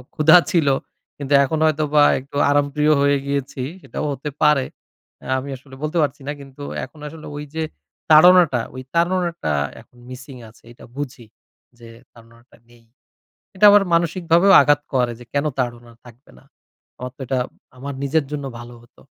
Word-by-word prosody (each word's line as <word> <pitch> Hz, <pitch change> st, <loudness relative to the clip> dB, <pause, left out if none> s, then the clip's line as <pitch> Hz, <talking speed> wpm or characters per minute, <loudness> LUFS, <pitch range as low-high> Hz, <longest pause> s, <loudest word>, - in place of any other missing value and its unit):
ক্ষুধা 155 Hz, +3 st, +6 dB
ছিল। 165 Hz, -6 st, +2 dB, 0.5 s
কিন্তু 145 Hz, 0 st, -3 dB
এখন 155 Hz, +3 st, -2 dB
হয়তোবা 150 Hz, -1 st, +2 dB, 0.2 s
একটু 140 Hz, +2 st, -9 dB
আরামপ্রিয় 145 Hz, +1 st, +2 dB
হয়ে 140 Hz, 0 st, +3 dB
গিয়েছি। 140 Hz, -1 st, -3 dB, 0.2 s
সেটাও 155 Hz, -, -6 dB
হতে 140 Hz, +2 st, -5 dB
পারে। 150 Hz, -3 st, +4 dB, 0.6 s
অ্যা -, -, -7 dB
আমি 135 Hz, +2 st, -8 dB
আসলে 135 Hz, 0 st, -16 dB
বলতে 155 Hz, +3 st, -2 dB
পারছি 145 Hz, -1 st, -2 dB
না। -, -, -1 dB
কিন্তু 140 Hz, +1 st, -12 dB, 0.2 s
এখন 155 Hz, -, -19 dB
আসলে 155 Hz, +1 st, -11 dB
ওই 150 Hz, -, -6 dB
যে 160 Hz, -, -1 dB, 0.5 s
তাড়নাটা, 160 Hz, -5 st, +6 dB
ঐ -, -, -14 dB, 0.2 s
তাড়নাটা 170 Hz, -, 0 dB, 0.3 s
এখন 125 Hz, -, -25 dB
মিসিং 130 Hz, +1 st, -10 dB
আছে। 110 Hz, -, -23 dB
এটা -, -, -15 dB
বুঝি 135 Hz, -4 st, -7 dB, 0.5 s
যে, 115 Hz, -1 st, -13 dB, 0.2 s
তাড়নাটা 115 Hz, +1 st, -20 dB
নেই। 120 Hz, -1 st, -22 dB, 0.7 s
এটা 190 Hz, -, +4 dB
আমার 205 Hz, -1 st, +6 dB
মানসিকভাবেও 170 Hz, +2 st, +2 dB
আঘাত 145 Hz, 0 st, +2 dB
করে 125 Hz, -2 st, +1 dB
যে, 120 Hz, -, -13 dB
কেনো 145 Hz, +2 st, 0 dB
তাড়না 120 Hz, -1 st, -4 dB
থাকবে 120 Hz, +2 st, -17 dB
না? -, -, -23 dB, 0.5 s
আমার 125 Hz, 0 st, -7 dB
তো -, -, -11 dB
এটা 130 Hz, +1 st, -1 dB, 0.4 s
আমার 140 Hz, +2 st, -6 dB
নিজের 145 Hz, +2 st, 0 dB
জন্য 145 Hz, -2 st, -4 dB
ভালো 120 Hz, 0 st, -11 dB
হতো। 120 Hz, -, -23 dB
140 Hz, 165 wpm, -20 LUFS, 130-155 Hz, 0.7 s, ক্ষুধা